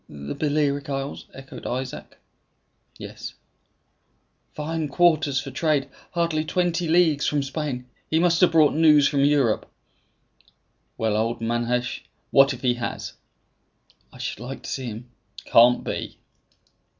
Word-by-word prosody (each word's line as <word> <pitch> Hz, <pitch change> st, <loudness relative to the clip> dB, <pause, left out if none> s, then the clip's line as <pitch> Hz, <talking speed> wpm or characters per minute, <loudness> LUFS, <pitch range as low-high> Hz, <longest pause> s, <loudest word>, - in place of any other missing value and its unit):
"The 70 Hz, 0 st, -7 dB
Balearic 145 Hz, -2 st, 0 dB
Isles?" 135 Hz, 0 st, -4 dB
echoed 135 Hz, 0 st, -10 dB
Isaac. 130 Hz, +1 st, -5 dB, 0.8 s
"Yes." -, -, -8 dB, 1.2 s
"Fine 155 Hz, +1 st, -3 dB
quarters 150 Hz, -3 st, +2 dB
for 135 Hz, -1 st, -7 dB
trade! 150 Hz, 0 st, 0 dB, 0.2 s
Hardly 170 Hz, -3 st, 0 dB
twenty 175 Hz, +1 st, 0 dB
leagues 160 Hz, -3 st, +3 dB
from 145 Hz, -1 st, 0 dB
Spain! 135 Hz, -3 st, -4 dB, 0.2 s
He 160 Hz, -, +2 dB
must 170 Hz, 0 st, +3 dB
have 180 Hz, -, +5 dB
brought 155 Hz, -3 st, +5 dB
news 150 Hz, -2 st, +5 dB
from 140 Hz, -2 st, +1 dB
Europe!" 140 Hz, -6 st, +2 dB, 1.3 s
"Well, 110 Hz, -2 st, 0 dB
old 115 Hz, +2 st, -1 dB
Manasseh, 120 Hz, +2 st, -1 dB, 0.3 s
what 135 Hz, 0 st, +6 dB
if 130 Hz, -2 st, -6 dB
he 125 Hz, -1 st, +3 dB
has?" 115 Hz, -, -4 dB, 1.0 s
"I -, -, -15 dB
should -, -, -5 dB
like 125 Hz, +3 st, -7 dB
to -, -, -7 dB
see 130 Hz, -2 st, -4 dB
him." 120 Hz, +2 st, -8 dB, 0.3 s
"Can't 120 Hz, +1 st, +5 dB
be." -, -, -5 dB
140 Hz, 130 wpm, -24 LUFS, 125-155 Hz, 1.3 s, what